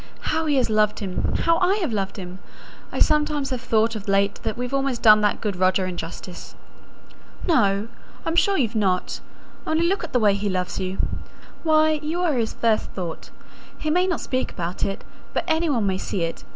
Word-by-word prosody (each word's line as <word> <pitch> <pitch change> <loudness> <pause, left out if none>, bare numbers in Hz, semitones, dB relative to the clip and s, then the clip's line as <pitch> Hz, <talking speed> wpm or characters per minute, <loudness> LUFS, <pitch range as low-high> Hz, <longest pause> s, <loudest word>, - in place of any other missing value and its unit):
How 320 0 0
he 295 - +2
has 260 - +3
loved 215 -1 +3
him! 190 -4 -2
How 335 0 +3
I 370 +2 +3
have 345 - -1
loved 195 -1 -2
him! 185 -1 -7 0.5
I - - -5
sometimes 300 -2 +2
have 255 -2 -2
thought 225 -1 +1
of 210 -2 -7
late 200 0 +2
that 220 - -3
we've 250 +2 -4
almost 275 -3 0
done 215 -1 +8
that 210 -1 +1
good 205 -3 -1
Roger 185 +1 +2
injustice." 175 0 -7 0.9
"No! 205 - +3 0.4
I'm 325 - -1
sure 390 +3 +3
you've 235 -5 +1
not: 190 -5 0 0.5
only 320 +2 +2
look 390 +1 0
at 335 - -6
the 250 - +2
way 210 -3 +4
he 200 +1 -1
loves 185 -1 -2
you. 190 0 -3 0.6
Why, 310 -1 +3
you 315 +3 -2
are 345 -4 +2
his 230 -4 0
first 225 -2 +1
thought: 175 -4 -6 0.5
he 310 - -2
may 360 +3 +3
not 355 -4 -1
speak 255 0 -2
about 175 0 -4
it, 195 - -2 0.3
but - - +1
any 320 0 +1
one 235 -7 +1
may 190 -1 0
see 190 -3 -2
it. 165 - -4
225 Hz, 200 wpm, -23 LUFS, 195-310 Hz, 0.9 s, done